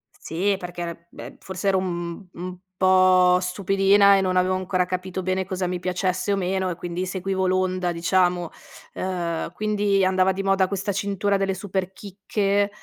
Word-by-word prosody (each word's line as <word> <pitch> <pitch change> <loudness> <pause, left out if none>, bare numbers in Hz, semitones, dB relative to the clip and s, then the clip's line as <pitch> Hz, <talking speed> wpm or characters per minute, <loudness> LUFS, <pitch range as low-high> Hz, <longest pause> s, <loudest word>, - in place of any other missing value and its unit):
Sì, 195 +5 -1
perché 175 -1 -7
era 170 0 -6
beh, - - -10
forse 190 +1 -5
ero 190 - +3
un 175 0 -4
un 180 +1 -7 0.3
po' 185 -1 +5
stupidina 195 +2 +4
e - - +2
non 185 -1 0
avevo 185 +1 +2
ancora 185 -1 0
capito 185 0 -4
bene 185 0 -1
cosa 185 0 -3
mi 180 0 -2
piacesse 185 +2 -1
o - - +3
meno 190 0 -1
e 175 - -3
quindi 175 +1 -4
seguivo 190 0 -1
l'onda, 185 -1 0
diciamo. 175 0 +1 0.4
Uhm, 175 -3 -3
quindi 205 -2 +1
andava 185 0 +3
di 195 +1 -3
moda 195 -1 +2
questa 200 +1 -2
cintura 200 0 0
delle 195 -1 -1
Superchicche, 195 +1 -2
185 Hz, 165 wpm, -23 LUFS, 180-195 Hz, 0.4 s, po